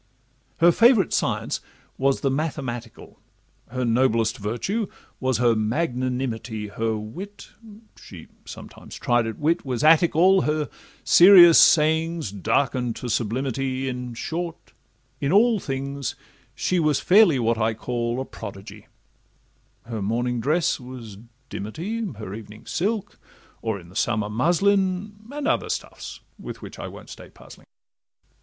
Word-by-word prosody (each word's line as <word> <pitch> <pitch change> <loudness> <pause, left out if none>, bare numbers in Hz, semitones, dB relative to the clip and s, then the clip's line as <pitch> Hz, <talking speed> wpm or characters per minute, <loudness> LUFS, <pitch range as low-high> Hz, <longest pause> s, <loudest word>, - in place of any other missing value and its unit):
Her 170 +1 +6
favourite 230 -1 +4
science - - -1 0.4
was 135 0 +1
the 135 - +1
mathematical, 130 -6 -5 0.5
Her 125 +1 -2
noblest 115 -2 +1
virtue 120 - -2 0.3
was 130 -3 0
her 120 -1 +3
magnanimity, 120 -2 -2
Her 110 +1 -2
wit 180 - -9 0.5
(she 85 -5 -12 0.2
sometimes - - -11
tried 120 -1 +1
at 115 - -5
wit) 165 +3 0
was 125 -2 -3
Attic 160 +1 +5
all, 185 +3 +5
Her 150 -1 -1 0.3
serious 175 -2 +8
sayings 160 - +3
darken'd 120 +4 0
to 125 - -6
sublimity; 130 +3 -2
In 125 -2 -5
short, 170 +6 -5 0.5
in 140 - -1
all 220 +3 +4
things 140 -3 -4 0.4
she 185 - 0
was 155 -3 +2
fairly 190 -6 +5
what 115 -1 0
I 110 0 +1
call 120 +1 -3
A 130 - -3
prodigy—her 105 +2 -12
morning 120 +4 -1
dress 155 +8 +1
was 125 -5 -10 0.3
dimity, 170 - -5
Her 105 -3 -8
evening 105 0 -10
silk, 205 +3 -2 0.4
or, 110 -3 -2
in 85 -1 -15
the 90 - -17
summer, 105 -3 0
muslin, 190 - +1
And 290 0 -3
other 320 - 0
stuffs, - - -6 0.2
with - - -8
which - - -10
I - - -5
won't - - -11
stay - - -11
puzzling. - - -16
130 Hz, 130 wpm, -24 LUFS, 115-170 Hz, 0.5 s, serious